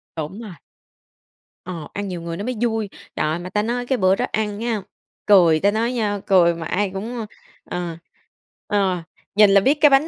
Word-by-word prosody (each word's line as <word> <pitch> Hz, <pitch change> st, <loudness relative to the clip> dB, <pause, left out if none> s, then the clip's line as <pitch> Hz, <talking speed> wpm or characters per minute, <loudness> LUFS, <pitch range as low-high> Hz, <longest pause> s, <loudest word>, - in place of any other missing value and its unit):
Đúng 165 Hz, +7 st, -5 dB
rồi. 215 Hz, -5 st, -8 dB, 1.1 s
Ờ, 175 Hz, -4 st, -6 dB
ăn 205 Hz, 0 st, -3 dB
nhiều 180 Hz, -3 st, -5 dB
người 170 Hz, 0 st, -5 dB
nó 200 Hz, -, -4 dB
mới 250 Hz, 0 st, -2 dB
vui. 225 Hz, -3 st, 0 dB, 0.3 s
Trời -, -, 0 dB
ơi, 160 Hz, +2 st, -1 dB
mà 180 Hz, +1 st, -7 dB
ta 210 Hz, +2 st, 0 dB
nói 245 Hz, +2 st, -2 dB
cái 260 Hz, +1 st, 0 dB
bữa 185 Hz, -2 st, +4 dB
đó -, -, 0 dB
ăn 210 Hz, -1 st, -1 dB
nha, 225 Hz, -2 st, -1 dB, 0.4 s
cười 175 Hz, -6 st, +6 dB
ta 200 Hz, +5 st, +3 dB
nói 230 Hz, +3 st, 0 dB
nha, 210 Hz, -4 st, -1 dB
cười 180 Hz, -4 st, +5 dB
mà 165 Hz, 0 st, -6 dB
ai 200 Hz, +5 st, 0 dB
cũng, 220 Hz, +6 st, -5 dB
ơ, 225 Hz, -, -3 dB, 0.4 s
ờ, 175 Hz, -2 st, -4 dB, 0.7 s
ờ, 190 Hz, -4 st, +1 dB, 0.3 s
nhìn 210 Hz, -1 st, +7 dB
là 195 Hz, 0 st, +6 dB
biết 280 Hz, +8 st, +3 dB
cái 300 Hz, -, +8 dB
bánh 275 Hz, +3 st, +4 dB
205 Hz, 210 wpm, -22 LUFS, 180-225 Hz, 1.1 s, cái